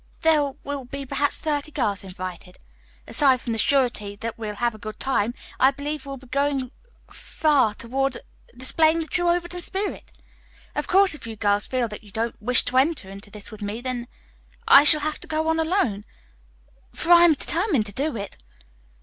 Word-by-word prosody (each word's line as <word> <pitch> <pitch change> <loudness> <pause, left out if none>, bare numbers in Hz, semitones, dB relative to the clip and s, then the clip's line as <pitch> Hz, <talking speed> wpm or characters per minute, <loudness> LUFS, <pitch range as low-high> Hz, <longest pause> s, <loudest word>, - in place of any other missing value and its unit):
There 320 -2 +4 0.2
will 280 -2 -5
be 275 +2 -7
perhaps 280 +2 +1
thirty 305 -1 -2
girls 210 -10 -1
invited. 185 -1 -8 0.5
Aside 270 -4 +4
from 235 -2 -4
the 225 - -3
surety 240 -8 +1
that 225 +2 -5
we'll 215 -2 -6
have 240 +2 0
a 215 - -13
good 215 0 -8
time, 240 -3 0 0.2
I 265 - +6
believe 285 +1 -5
we - - -7
will 275 - -6
be 260 - -16
going 275 -1 -1 0.4
far 275 -9 +1
toward 265 +3 -1 0.4
displaying 315 +5 +2
the - - -4
true 350 +1 0
Overton 350 +1 -1
spirit. 390 +4 -3 0.6
Of - - -3
course, 390 -1 +4
if 255 -6 -8
you 225 - -6
girls 205 -1 0
feel 255 -2 -1
that 210 0 -9
you 210 - -16
don't 225 +2 -4
wish 245 +3 +3
to 250 +1 -1
enter 265 - +1
into 200 +1 -10
this 205 0 -8
with 215 0 -11
me, 205 +2 -4
then 245 -1 -4 0.6
I 275 - +9
shall 305 0 +9
have 305 +1 -3
to 355 - -4
go 315 0 -1
on 320 0 +1
alone, 320 - 0 0.9
for 335 - -1
I 345 0 +8
am 340 -2 +6
determined 325 - 0
to 205 - -8
do 285 +5 -1
it. 200 -1 -8
260 Hz, 190 wpm, -23 LUFS, 220-310 Hz, 0.9 s, I